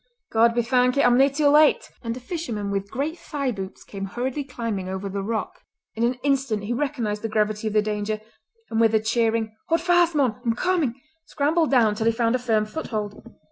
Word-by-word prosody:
"God 230 +1 +4
be 240 - +2
thankit, 250 +2 +3
I'm 245 0 +5
nae 270 +2 +6
too 285 +1 +2
late!" 300 +1 +4
and 230 0 -4
a - - -6
fisherman 245 - -4
with 200 0 -2
great 300 - -3
thigh 280 -4 -2
boots 195 -3 -7
came 195 -1 -6
hurriedly 255 +7 -3
climbing 230 -8 -4
over 190 +1 -4
the 195 0 -3
rock. 215 0 -3 0.3
In 225 - -2
an 245 +2 +2
instant 270 -7 0
he 220 +4 -2
recognised 240 -6 -2
the 225 - -3
gravity 215 0 0
of 215 - -2
the 215 -1 +3
danger, 210 0 -2 0.5
and 225 - +1
with 225 -1 +4
a - - +5
cheering 220 0 0
"Haud 330 +1 +2
fast, 350 -1 +3
mon! 250 -5 +1
I'm 230 -2 +1
comin'!" 325 -6 0 0.3
scrambled 315 +2 +1
down 235 -6 +4
till 220 +2 -1
he - - +5
found 230 0 +1
a 255 - +1
firm 220 -3 +1
foothold. 215 -5 -5
230 Hz, 210 wpm, -24 LUFS, 215-275 Hz, 0.5 s, nae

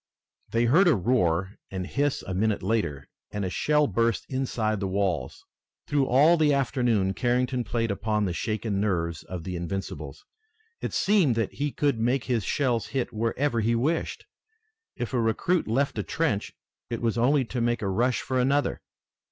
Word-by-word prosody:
They 115 +1 +2
heard 165 +11 +5
a 170 - +5
roar 95 -4 +1
and 95 -1 -4
hiss 145 +7 -1
a 95 - -5
minute 105 +1 0
later, 95 -10 -1 0.2
and 105 -1 -3
a 90 - -3
shell 150 +9 +2
burst 115 -1 0
inside 115 -5 -1
the 100 - -2
walls. 95 -8 -2 0.4
Through 140 -2 +1
all 150 +7 +5
the 150 -3 +3
afternoon 120 -7 +1
Carrington 125 +3 0
played 115 0 -1
upon 105 +1 0
the 90 - -1
shaken 105 +1 -2
nerves 85 -5 -1
of 90 -3 -7
the 90 +1 -4
Invincibles. 90 +3 -5 0.6
It - - -3
seemed 190 - +3
that 115 -3 -1
he 145 0 -2
could 140 -5 0
make 120 +3 +1
his 120 -5 0
shells 120 -5 0
hit 130 -3 -2
wherever 115 +4 0
he 115 +2 +2
wished. 155 +8 -1 0.7
If 120 +1 -4
a 125 - +2
recruit 155 +10 +1
left 135 +6 0
a - - -1
trench 155 -11 -1 0.4
it 115 - -3
was 115 -2 +1
only 130 +3 +3
to 120 +1 -3
make 120 -1 0
a - - 0
rush 120 +6 +1
for 130 -1 -1
another. 140 +3 +1
115 Hz, 175 wpm, -26 LUFS, 100-135 Hz, 0.7 s, heard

